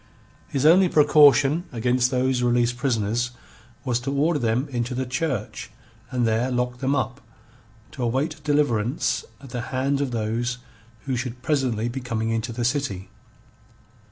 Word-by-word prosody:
His 135 Hz, +1 st, -1 dB
only 180 Hz, +3 st, +6 dB
precaution 145 Hz, +1 st, +5 dB
against 125 Hz, +1 st, +1 dB
those 130 Hz, 0 st, +1 dB
released 120 Hz, 0 st, +2 dB
prisoners 120 Hz, -2 st, 0 dB, 0.6 s
was 125 Hz, -2 st, 0 dB
to 135 Hz, +3 st, -4 dB
order 150 Hz, +3 st, +1 dB
them 120 Hz, +4 st, 0 dB
into 125 Hz, -1 st, -3 dB
the 130 Hz, +1 st, -2 dB
church 130 Hz, -3 st, -3 dB, 0.4 s
and 125 Hz, -2 st, 0 dB
there 115 Hz, +3 st, +1 dB
lock 125 Hz, 0 st, -2 dB
them 135 Hz, +1 st, +1 dB
up, 130 Hz, -2 st, -2 dB, 0.7 s
to 130 Hz, -, -8 dB
await 140 Hz, +6 st, -1 dB
deliverance 145 Hz, -5 st, +1 dB, 0.2 s
at 135 Hz, -3 st, -12 dB
the 120 Hz, -, -3 dB
hands 135 Hz, +2 st, 0 dB
of 140 Hz, -, -1 dB
those 120 Hz, +2 st, -2 dB, 0.4 s
who 135 Hz, -2 st, -3 dB
should 125 Hz, 0 st, -5 dB
presently 130 Hz, -7 st, 0 dB
be 120 Hz, +3 st, -4 dB
coming 115 Hz, -3 st, -2 dB
into 115 Hz, +1 st, -2 dB
the 120 Hz, +1 st, -3 dB
city. 125 Hz, -8 st, -2 dB
125 Hz, 150 wpm, -24 LUFS, 120-140 Hz, 0.7 s, only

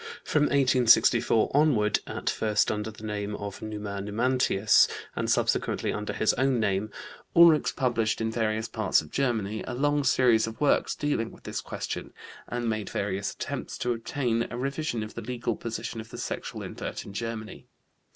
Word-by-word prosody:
From 150 Hz, -1 st, +2 dB
1864 125 Hz, -4 st, +4 dB
onward, 135 Hz, -9 st, +3 dB
at -, -, -6 dB
first 105 Hz, -1 st, +2 dB
under 105 Hz, 0 st, -3 dB
the 110 Hz, 0 st, -12 dB
name 105 Hz, -1 st, -3 dB
of 100 Hz, -1 st, -7 dB
"Numa 105 Hz, -2 st, -5 dB
Numantius" 110 Hz, 0 st, +3 dB, 0.3 s
and -, -, -2 dB
subsequently -, -, +1 dB
under 105 Hz, 0 st, -3 dB
his 110 Hz, -, +2 dB
own 130 Hz, -2 st, +1 dB
name, 100 Hz, 0 st, 0 dB, 0.5 s
Ulrichs 170 Hz, -3 st, +6 dB
published, 120 Hz, -4 st, 0 dB
in 110 Hz, 0 st, -1 dB
various 110 Hz, -1 st, -1 dB
parts 110 Hz, -8 st, +1 dB
of 75 Hz, -, -14 dB
Germany, 110 Hz, -6 st, -1 dB
a 125 Hz, -, -4 dB
long 145 Hz, +2 st, +1 dB
series 120 Hz, -5 st, +4 dB
of 110 Hz, 0 st, -8 dB
works 145 Hz, -, +2 dB
dealing 145 Hz, -6 st, -1 dB
with -, -, -16 dB
this -, -, -4 dB
question, -, -, -5 dB, 0.3 s
and 120 Hz, -1 st, -3 dB
made 110 Hz, -2 st, -2 dB
various 100 Hz, 0 st, -2 dB
attempts -, -, -5 dB
to 125 Hz, -, -1 dB
obtain 115 Hz, 0 st, -1 dB
a -, -, -6 dB
revision 135 Hz, -2 st, -2 dB
of 110 Hz, -, -8 dB
the -, -, -6 dB
legal 120 Hz, 0 st, -3 dB
position 115 Hz, 0 st, -5 dB
of 110 Hz, -, -13 dB
the -, -, -9 dB
sexual -, -, -5 dB
invert -, -, -6 dB
in 100 Hz, -, -9 dB
Germany. 110 Hz, 0 st, -5 dB
115 Hz, 170 wpm, -27 LUFS, 105-125 Hz, 0.5 s, Ulrichs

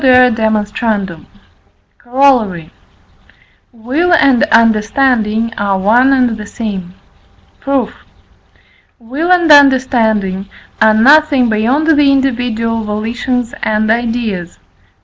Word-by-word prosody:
E.D. 250 Hz, -2 st, +4 dB, 1.6 s
Corollary. 240 Hz, -, 0 dB, 1.0 s
Will 265 Hz, +10 st, -2 dB
and 275 Hz, -7 st, +3 dB
understanding 230 Hz, -1 st, +1 dB
are 200 Hz, -1 st, -1 dB
one 235 Hz, +8 st, +2 dB
and 250 Hz, -4 st, +1 dB
the 210 Hz, -, -8 dB
same. 190 Hz, -6 st, -7 dB, 0.6 s
Proof. 275 Hz, -4 st, -2 dB, 1.0 s
Will 280 Hz, +10 st, -4 dB
and 345 Hz, -3 st, +3 dB
understanding 225 Hz, -9 st, +2 dB, 0.3 s
are 220 Hz, -1 st, +4 dB
nothing 275 Hz, +1 st, +3 dB
beyond 235 Hz, +8 st, 0 dB
the 295 Hz, -3 st, +3 dB
individual 235 Hz, -4 st, -2 dB
volitions 235 Hz, +3 st, -4 dB
and 215 Hz, 0 st, -1 dB
ideas 225 Hz, -6 st, -3 dB
(II. -, -, -36 dB
235 Hz, 90 wpm, -13 LUFS, 215-270 Hz, 1.6 s, E.D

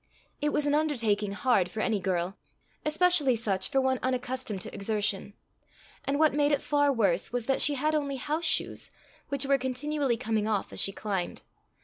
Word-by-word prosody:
It 295 Hz, 0 st, +1 dB
was 295 Hz, -, 0 dB
an 290 Hz, -, +1 dB
undertaking 230 Hz, -10 st, +1 dB
hard 205 Hz, -5 st, +2 dB
for 215 Hz, -, -6 dB
any 215 Hz, -1 st, +1 dB
girl, 180 Hz, 0 st, -1 dB, 0.5 s
especially 305 Hz, -4 st, +4 dB
such 195 Hz, -4 st, 0 dB
for 270 Hz, -, +2 dB
one 260 Hz, -1 st, +1 dB
unaccustomed 255 Hz, -5 st, -2 dB
to -, -, -5 dB
exertion; 205 Hz, -1 st, -2 dB, 0.7 s
and 280 Hz, +1 st, 0 dB
what 310 Hz, -1 st, +4 dB
made 290 Hz, 0 st, +2 dB
it 285 Hz, -, +3 dB
far 290 Hz, -1 st, +2 dB
worse 195 Hz, -8 st, +1 dB
was 245 Hz, -2 st, -1 dB
that 270 Hz, +1 st, +1 dB
she 290 Hz, -, +4 dB
had 305 Hz, +3 st, 0 dB
only 285 Hz, -2 st, -1 dB
house 305 Hz, +5 st, -2 dB
shoes, -, -, 0 dB, 0.4 s
which 280 Hz, -1 st, 0 dB
were 275 Hz, 0 st, +3 dB
continually 260 Hz, 0 st, -1 dB
coming 220 Hz, -3 st, -1 dB
off 210 Hz, -3 st, -1 dB
as -, -, -4 dB
she 195 Hz, -, +1 dB
climbed. 195 Hz, -3 st, -4 dB
255 Hz, 185 wpm, -28 LUFS, 210-290 Hz, 0.7 s, especially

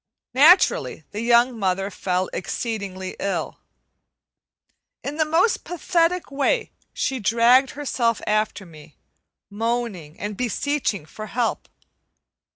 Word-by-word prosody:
Naturally, 310 Hz, +9 st, +5 dB
the 210 Hz, -, -4 dB
young 235 Hz, 0 st, +3 dB
mother 195 Hz, 0 st, 0 dB
fell 185 Hz, 0 st, -1 dB
exceedingly 190 Hz, -2 st, -4 dB
ill. 185 Hz, -5 st, -3 dB, 1.4 s
In 290 Hz, +2 st, -4 dB
the 315 Hz, -, +2 dB
most 330 Hz, +8 st, +2 dB
pathetic 350 Hz, -1 st, 0 dB
way 285 Hz, -, 0 dB, 0.2 s
she 265 Hz, -1 st, -2 dB
dragged 235 Hz, +5 st, +4 dB
herself 240 Hz, -6 st, 0 dB
after 215 Hz, -2 st, 0 dB
me, 155 Hz, -3 st, -15 dB, 0.5 s
moaning 220 Hz, -7 st, -3 dB
and 205 Hz, 0 st, -4 dB
beseeching 250 Hz, -, -1 dB
for 215 Hz, +7 st, -9 dB
help. 235 Hz, +1 st, -2 dB
230 Hz, 105 wpm, -23 LUFS, 195-275 Hz, 1.4 s, Naturally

